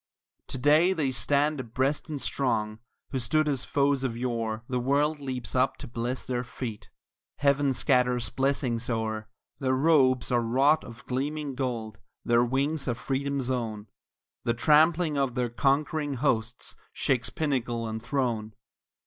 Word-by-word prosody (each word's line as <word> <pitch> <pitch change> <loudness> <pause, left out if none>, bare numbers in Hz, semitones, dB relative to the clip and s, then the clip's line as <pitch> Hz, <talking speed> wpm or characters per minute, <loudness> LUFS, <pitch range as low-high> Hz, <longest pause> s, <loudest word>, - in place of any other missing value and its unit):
To - - -3
day 155 +7 +4
they 150 -7 0
stand 145 +4 +1
abreast 130 +6 -1
and 150 -2 -3
strong, 110 -6 -1 0.3
who 130 - -1
stood 155 +5 +1
as 140 -4 0
foes 140 -1 +1
of 120 -3 -2
yore, 115 -3 -2
The 125 -1 -1
world 145 +4 +1
leaps 130 -3 -4
up 130 +1 +2
to - - -8
bless 120 +2 -3
their 125 -1 -2
feet, 125 -3 -7 0.5
heaven 140 -1 +3
scatters 125 -3 +2
blessings 130 -2 0
o'er; 110 -2 -2 0.3
Their 130 -1 +1
robes 135 -3 +3
are 120 -1 +3
wrought 135 +7 +3
of 115 -1 -12
gleaming 145 +2 -2
gold, 120 -5 -3 0.3
their 120 0 +4
wings 140 +4 -1
are 120 - 0
freedom's 135 0 -2
own, 110 -4 -3 0.5
The 115 - 0
trampling 155 +3 +4
of 135 -3 0
their 125 -2 0
conquering 145 +3 0
hosts 120 -3 -1 0.2
shakes 130 -1 0
pinnacle 125 -7 -1
and 110 0 -4
throne. 115 -6 -2
130 Hz, 150 wpm, -28 LUFS, 120-140 Hz, 0.5 s, day